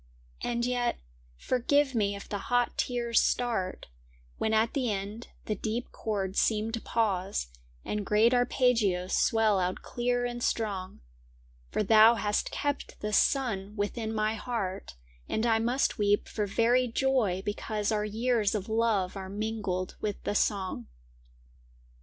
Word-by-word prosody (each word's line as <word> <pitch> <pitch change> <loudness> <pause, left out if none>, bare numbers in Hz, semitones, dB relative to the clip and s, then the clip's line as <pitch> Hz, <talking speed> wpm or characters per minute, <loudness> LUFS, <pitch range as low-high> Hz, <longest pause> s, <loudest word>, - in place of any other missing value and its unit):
And 235 0 0
yet, 245 -1 0 0.4
forgive 265 - +1
me 205 -3 +1
if 200 - -9
the 205 - -3
hot 245 -1 +2
tears 240 -2 +1
start, 225 -7 -1 0.5
When 220 - 0
at 220 +1 +2
the 255 -5 0
end 205 +3 -5 0.2
the 215 - -1
deep 225 +3 -3
chords 200 -3 -2
seem 220 0 +1
to 230 0 -3
pause 195 - -1 0.4
And 210 -1 -2
great 215 +4 +3
arpeggios 230 -7 +2
swell 220 -3 +3
out 180 0 -2
clear 245 0 -1
and 240 0 -4
strong, 200 -6 -2 0.7
For - - 0
thou 220 +2 +7
hast 210 -2 0
kept 285 -1 -3
the 210 0 -3
sun 210 -5 +1
within 220 +2 -2
my 215 0 0
heart 205 - -4 0.3
And 220 - 0
I 225 -1 +3
must 240 +3 0
weep 205 0 +2
for 210 -2 -2
very 240 +5 +3
joy 230 -7 +1
because 210 +1 -2
Our 210 -1 +1
years 220 0 +1
of 200 -2 -3
love 220 -4 +1
are 190 -1 -6
mingled 200 -3 -3
with 210 -2 -3
the - - -1
song. 190 - -1
220 Hz, 145 wpm, -29 LUFS, 200-240 Hz, 0.7 s, thou